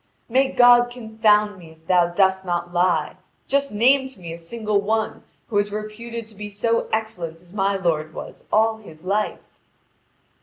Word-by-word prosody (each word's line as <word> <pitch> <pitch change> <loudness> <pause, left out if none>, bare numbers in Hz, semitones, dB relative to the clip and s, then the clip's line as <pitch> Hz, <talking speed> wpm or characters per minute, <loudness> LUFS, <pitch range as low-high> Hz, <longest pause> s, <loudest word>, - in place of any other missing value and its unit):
"May 265 +3 +2
God 245 0 +6
confound 220 -4 +1
me, 165 -2 -13
if 160 0 -26
thou 180 -2 +4
dost 190 +2 +2
not 175 -1 -3
lie! 175 -4 +1 0.3
Just 280 +1 +1
name 260 +6 +4
to 260 -7 -15
me 170 -2 -7
a - - -7
single 210 +3 -1
one 220 +2 -1 0.3
who 205 -3 +2
is 205 0 -1
reputed 220 +2 -6
to 220 - -15
be 210 0 -7
so 230 +3 0
excellent 185 -7 -3
as 175 +1 -20
my 200 -1 +1
lord 160 -5 -1
was - - -9
all 220 +1 +3
his 160 -7 -15
life." 205 +3 -1
210 Hz, 175 wpm, -22 LUFS, 180-225 Hz, 0.3 s, God